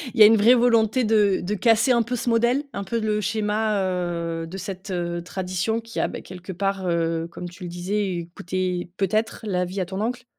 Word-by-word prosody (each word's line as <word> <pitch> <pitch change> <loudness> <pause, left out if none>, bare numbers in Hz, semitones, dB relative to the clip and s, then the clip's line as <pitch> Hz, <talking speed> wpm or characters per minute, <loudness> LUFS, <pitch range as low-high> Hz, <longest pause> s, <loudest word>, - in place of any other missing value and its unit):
Il - - -3
y - - +11
a - - +11
une 220 +2 +7
vraie 225 +4 +6
volonté 235 0 +3
de 210 -3 +3
de 190 +4 -2
casser 225 +5 +3
un 235 -1 +4
peu 235 +2 -2
ce 240 - -5
modèle? 240 +4 +2
Un 200 - -3
peu 230 +3 -2
le 215 -1 0
schéma, 215 0 0
heu, 170 -3 -2
de 185 +4 -7
cette, 195 +1 -7
heu, 175 -2 -2
tradition 185 +4 -2
qui 230 0 -7
a, - - +2
bah, - - -7
quelque 185 0 -9
part, 195 +1 -2
heu, 165 -1 0
comme 175 +1 -7
tu 175 +2 -11
le 175 - -5
disais, 180 0 -2
coûté 180 0 -2
peut-être 215 +3 0
la 185 -4 0
vie 185 +3 -5
à 185 - 0
ton 190 +3 -5
oncle? 245 +3 -2
195 Hz, 225 wpm, -24 LUFS, 180-220 Hz, -, y